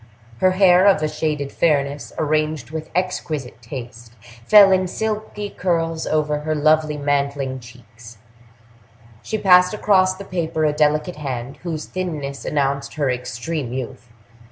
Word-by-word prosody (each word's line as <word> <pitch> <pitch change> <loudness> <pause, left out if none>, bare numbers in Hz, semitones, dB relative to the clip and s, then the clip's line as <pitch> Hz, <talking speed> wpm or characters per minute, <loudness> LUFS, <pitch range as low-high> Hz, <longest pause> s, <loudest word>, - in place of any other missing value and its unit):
Her 185 0 +3
hair, 185 0 +5
of 190 -6 +4
a - - +2
shaded 150 -2 -3
fairness, 145 -3 0
arranged 155 -3 -1
with 160 0 -6
exquisite 155 -9 -3
taste, 120 -1 -9 0.3
fell 200 - +7
in 185 0 +2
silky 210 0 -4
curls 165 -3 -1
over 150 -1 0
her 155 +1 -2
lovely 155 0 +2
mantling 140 -2 -1
cheeks; 115 -1 -15 1.0
she 220 - -3
passed 180 -1 +5
across 185 -3 +3
the 195 +1 -9
paper 165 -4 -2
a 150 - +2
delicate 150 +3 +1
hand, 135 -3 -5
whose 160 -3 -5
thinness 150 -7 -5
announced 140 -1 -1
her 145 -4 0
extreme 125 +3 -4
youth. 125 -1 -6
150 Hz, 135 wpm, -21 LUFS, 135-180 Hz, 1.0 s, fell